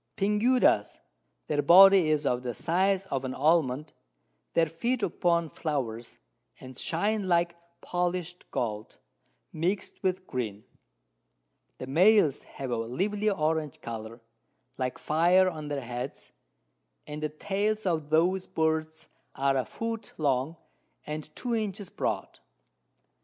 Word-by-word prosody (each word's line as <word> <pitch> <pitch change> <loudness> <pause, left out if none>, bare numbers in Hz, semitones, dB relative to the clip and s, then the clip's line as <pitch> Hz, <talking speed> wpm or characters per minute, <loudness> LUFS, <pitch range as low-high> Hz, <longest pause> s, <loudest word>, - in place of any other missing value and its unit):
Pinguedas, 210 - +2 0.5
their 145 - 0
Body 185 +2 +8
is 150 -1 +1
of 125 -2 +1
the 120 -2 -4
size 190 +3 +1
of 135 -1 -1
an 130 0 -4
Almond; 150 -2 +1 0.6
they 165 - +5
feed 220 +10 -2
upon 170 -3 +1
Flowers, 120 -7 -4 0.4
and 130 0 -11
shine 200 - -1
like 170 -1 +2 0.3
polish'd 180 0 -3
Gold, 110 -2 -4 0.6
mix'd 180 +6 -2
with 185 0 -1
green; 110 - -4 1.1
the - - -6
Males 165 +1 +4
have 135 -2 -7
a 120 - 0
lively 195 - -1
Orange 155 -5 -1
Colour, 115 0 -7 0.6
like 130 -1 -2
Fire 175 +4 +3
on 155 -4 -4
their 145 -1 -3
Heads, 120 0 -6 0.7
and 150 0 -7
the 155 - -1
Tails 205 +7 -2
of 160 -5 -1
those 180 +4 +2
Birds 160 0 -1 0.3
are 135 0 +1
a 130 -2 0
Foot 225 - -5
long, 140 +1 0 0.5
and 150 0 -5
2 245 -1 -3
Inches 210 -3 -3
broad. - - -3
160 Hz, 125 wpm, -28 LUFS, 135-190 Hz, 1.1 s, Body